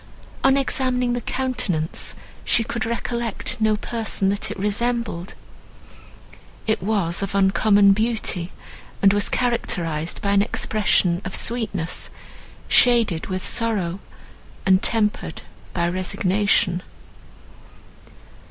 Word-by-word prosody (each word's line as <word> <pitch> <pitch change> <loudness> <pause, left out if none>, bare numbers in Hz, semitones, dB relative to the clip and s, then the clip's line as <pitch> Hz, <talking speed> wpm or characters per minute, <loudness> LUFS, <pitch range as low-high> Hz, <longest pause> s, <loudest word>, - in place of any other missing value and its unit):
On 270 0 +5
examining 255 -2 +1
the 245 - -2
countenance 220 -12 -2 0.3
she 230 - +3
could 230 0 -3
recollect 235 -1 -2
no 215 0 +3
person 215 -3 0
that 205 +2 -1
it 215 - -6
resembled. 210 -2 -2 1.3
It 220 - 0
was 190 -4 0
of 195 0 -3
uncommon 200 +1 +4
beauty, 210 -5 -2 0.5
and 195 0 +6
was 205 0 +1
characterised 175 -10 -1
by 200 - -1
an 200 0 +4
expression 200 -4 +1
of 190 - -4
sweetness, 200 -8 0 0.6
shaded 230 -9 +4
with 185 -1 -4
sorrow, 200 -6 -1 0.7
and 190 0 +4
tempered 215 -2 0 0.3
by 170 -1 0
resignation. 185 +1 +1
205 Hz, 105 wpm, -22 LUFS, 185-235 Hz, 1.3 s, and